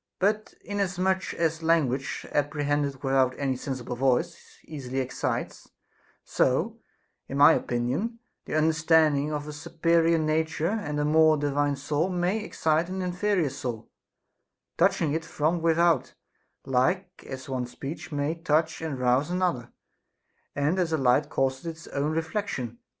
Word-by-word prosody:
But 210 Hz, +3 st, 0 dB
inasmuch 190 Hz, -2 st, 0 dB
as 165 Hz, -1 st, 0 dB
language, 145 Hz, -5 st, 0 dB
apprehended 145 Hz, -1 st, -1 dB
without 135 Hz, -1 st, +2 dB
any 135 Hz, -2 st, 0 dB
sensible 125 Hz, -1 st, -5 dB
voice, 135 Hz, +7 st, -1 dB
easily 135 Hz, -4 st, -6 dB
excites; 130 Hz, -1 st, -3 dB, 0.5 s
so, -, -, 0 dB, 0.5 s
in 135 Hz, -, -4 dB
my 145 Hz, +3 st, +8 dB
opinion, 135 Hz, -, -1 dB, 0.3 s
the -, -, -4 dB
understanding 155 Hz, -2 st, +3 dB
of 150 Hz, 0 st, -3 dB
a 150 Hz, -, -6 dB
supe 160 Hz, +2 st, -12 dB
rior 165 Hz, 0 st, +4 dB
nature 160 Hz, +2 st, 0 dB
and 205 Hz, -10 st, -2 dB
a 145 Hz, -, +1 dB
more 155 Hz, 0 st, +5 dB
divine 145 Hz, 0 st, 0 dB
soul 150 Hz, +5 st, -1 dB
may 180 Hz, +3 st, 0 dB
excite 160 Hz, -4 st, 0 dB
an 190 Hz, 0 st, -3 dB
inferior 180 Hz, -3 st, 0 dB
soul, 125 Hz, -4 st, -5 dB, 0.9 s
touching 150 Hz, -3 st, +2 dB
it 160 Hz, +1 st, -1 dB
from 165 Hz, +1 st, -1 dB
without, 165 Hz, -2 st, +2 dB, 0.5 s
like 180 Hz, +9 st, 0 dB
as 130 Hz, -1 st, -7 dB
one 130 Hz, -2 st, -2 dB
speech 140 Hz, +7 st, -7 dB
may 145 Hz, +1 st, -1 dB
touch 160 Hz, -1 st, 0 dB
and 155 Hz, -4 st, -3 dB
rouse 125 Hz, +4 st, +2 dB
another, 175 Hz, -10 st, -1 dB, 0.8 s
and 150 Hz, +6 st, +1 dB
as 175 Hz, -3 st, 0 dB
light 140 Hz, 0 st, +3 dB
causes 135 Hz, +3 st, -1 dB
its 165 Hz, 0 st, -7 dB
own 145 Hz, +2 st, -1 dB
re 165 Hz, +1 st, 0 dB
flection. 160 Hz, -, -4 dB
155 Hz, 140 wpm, -27 LUFS, 135-170 Hz, 0.9 s, my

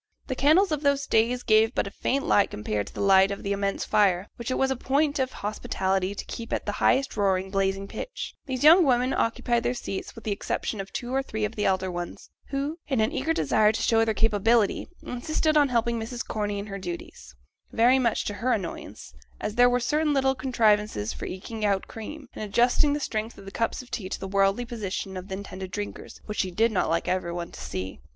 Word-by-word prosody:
The 260 Hz, -, -3 dB
candles 315 Hz, +9 st, +4 dB
of 300 Hz, -2 st, 0 dB
those 280 Hz, -1 st, +2 dB
days 240 Hz, +3 st, +2 dB
gave 220 Hz, +2 st, +4 dB
but -, -, +1 dB
a 200 Hz, -, -6 dB
faint 275 Hz, +6 st, -1 dB
light 205 Hz, -, +4 dB
compared 105 Hz, -1 st, -3 dB
to -, -, -11 dB
the -, -, -3 dB
light 195 Hz, -1 st, +6 dB
of 200 Hz, -, -5 dB
the 200 Hz, -, -2 dB
immense 200 Hz, 0 st, -1 dB
fire, 195 Hz, -2 st, +2 dB
which 235 Hz, +1 st, -6 dB
it 255 Hz, -, 0 dB
was 265 Hz, 0 st, +2 dB
a -, -, +1 dB
point 285 Hz, +3 st, +1 dB
of 260 Hz, -1 st, 0 dB
hospitality 195 Hz, -2 st, -2 dB
to -, -, -6 dB
keep 230 Hz, -1 st, -7 dB
at -, -, -1 dB
the 205 Hz, -, -1 dB
highest 270 Hz, +1 st, +3 dB
roaring, 190 Hz, -2 st, +1 dB
blazing 195 Hz, 0 st, 0 dB
pitch; -, -, -6 dB
the 260 Hz, -, -2 dB
young 315 Hz, +7 st, +7 dB
women 255 Hz, -2 st, +2 dB
occupied 235 Hz, +1 st, +1 dB
the 245 Hz, -, -1 dB
seats, 195 Hz, -5 st, -5 dB
with 230 Hz, -, -11 dB
the 215 Hz, -, -2 dB
exception 205 Hz, +1 st, -2 dB
of 195 Hz, -, -10 dB
two 245 Hz, +1 st, -4 dB
or 270 Hz, -, +2 dB
three 220 Hz, -5 st, -3 dB
of 210 Hz, -, -5 dB
the 210 Hz, -, -1 dB
elder 190 Hz, -1 st, +1 dB
ones, 175 Hz, 0 st, -6 dB, 0.2 s
who, 285 Hz, +4 st, -3 dB
in 265 Hz, -5 st, 0 dB
an 220 Hz, +1 st, +2 dB
eager 300 Hz, +5 st, -1 dB
desire 215 Hz, -9 st, +3 dB
to 220 Hz, -, -3 dB
show 225 Hz, -1 st, +4 dB
their 220 Hz, -1 st, 0 dB
capability, 225 Hz, 0 st, +2 dB, 0.2 s
insisted 310 Hz, +5 st, -1 dB
on 290 Hz, -2 st, +5 dB
helping 235 Hz, -1 st, +1 dB
Mrs. 235 Hz, +2 st, -5 dB
Corney 205 Hz, -1 st, -2 dB
in 200 Hz, -, -4 dB
her 195 Hz, -1 st, -6 dB
duties, 175 Hz, -, -8 dB, 0.4 s
very 245 Hz, +3 st, +4 dB
much 235 Hz, -4 st, +1 dB
to 205 Hz, -, -2 dB
her 245 Hz, +6 st, 0 dB
annoyance, 170 Hz, -, -5 dB, 0.3 s
as 210 Hz, -, -3 dB
there 245 Hz, +2 st, +6 dB
were 245 Hz, 0 st, +2 dB
certain 300 Hz, +5 st, +1 dB
little 265 Hz, -1 st, +3 dB
contrivances 210 Hz, -, +1 dB
for -, -, -6 dB
eking 215 Hz, +4 st, -6 dB
out 200 Hz, -2 st, +1 dB
cream, 270 Hz, +6 st, -8 dB
and -, -, -6 dB
adjusting 245 Hz, +7 st, +3 dB
the 295 Hz, -, -1 dB
strength 220 Hz, -4 st, -3 dB
of 195 Hz, -, -12 dB
the 195 Hz, -, -8 dB
cups 230 Hz, +3 st, -2 dB
of 250 Hz, -, -19 dB
tea 185 Hz, -4 st, -4 dB
to -, -, -4 dB
the 195 Hz, -, -5 dB
worldly 195 Hz, +4 st, +2 dB
position 205 Hz, -4 st, -4 dB
of 185 Hz, 0 st, -6 dB
the 190 Hz, -, -4 dB
intended 190 Hz, -1 st, -7 dB
drinkers, 205 Hz, +2 st, -6 dB
which 210 Hz, -, -5 dB
she 190 Hz, -, +1 dB
did 220 Hz, +6 st, +2 dB
not 195 Hz, -, +1 dB
like 165 Hz, +1 st, 0 dB
every 185 Hz, -1 st, -1 dB
one 170 Hz, 0 st, -5 dB
to -, -, -11 dB
see. 95 Hz, +1 st, -5 dB
220 Hz, 230 wpm, -26 LUFS, 195-255 Hz, 0.4 s, young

